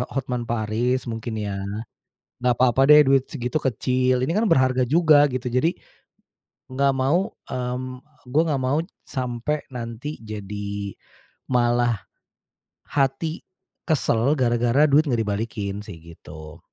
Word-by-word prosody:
Hotman 125 -3 -2
Paris, 120 +3 0
mungkin 115 0 -4
ya. 100 -2 -3 0.8
Nggak 125 -1 +2
papa 130 +1 +4
deh, 150 0 +9
duit 135 -1 +3
segitu 125 +5 -2
kecil. 130 0 +1
Ini 160 - -1
kan 215 +5 +1
berharga 130 -5 +3
juga, 155 -1 +5
gitu. 125 -1 -3
Jadi, 155 +8 +1 0.9
nggak 140 +1 +1
mau, 170 +11 +1 0.2
mmm, 125 +1 -4 0.2
gue 140 +6 +3
nggak 140 -4 0
mau 130 +4 +1 0.3
sampai 130 +3 -3
nanti 120 +4 -6
jadi 100 -2 -5 0.6
malah, 120 -1 +2 0.9
hati 140 +4 -1 0.5
kesel, 140 -3 +2
gara-gara 120 +2 +3
duit 150 +3 +4
nggak 120 -4 +1
dibalikin, 105 -1 -3
sih. 85 - -9
Gitu. 80 -2 -12
125 Hz, 120 wpm, -23 LUFS, 115-140 Hz, 0.9 s, deh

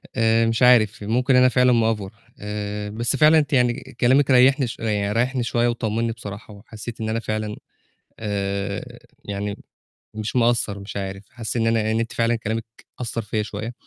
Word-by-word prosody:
آآ 115 0 +3
مش 115 +1 0
عارف، 110 -4 +4
ممكن 125 +5 +2
أنا 125 0 +6
فعلًا 125 0 +4
مأفور 110 -4 0 0.3
آآ، 105 0 -4
بس 115 +5 -1
فعلًا 155 +3 +6
أنتِ 150 0 -2
يعني 125 -2 +3 0.3
كلامِك 135 +3 +4
ريّحني 130 +1 +5
شوية 115 -1 -4
يعن 105 -1 0
ريّحني 125 +2 +1
شوية 120 0 +1
وطمنّي 115 -1 -1
بصراحة، 105 -1 -9
وحسيت 110 +2 -9
إن 110 - -2
أنا 110 +1 0
فعلًا، 110 -1 -3 0.6
آآ، 100 -1 -3 0.3
يعني 100 0 -4 0.6
مش 110 +2 -5
مقصّر، 115 -4 +2
مش 100 +1 -7
عارف، 95 0 -5
حاسس 115 -1 -4
إن 115 -1 +1
أنا 115 0 +2
أ 110 +1 -1
إن 110 - +1
أنتِ 115 0 -3
فعلًا 115 0 +1
كلامك 110 0 -3 0.4
أثّر 115 -1 -3
فيَّ 105 0 -2
شوية، 110 +3 -6
115 Hz, 175 wpm, -22 LUFS, 105-120 Hz, 0.6 s, أنا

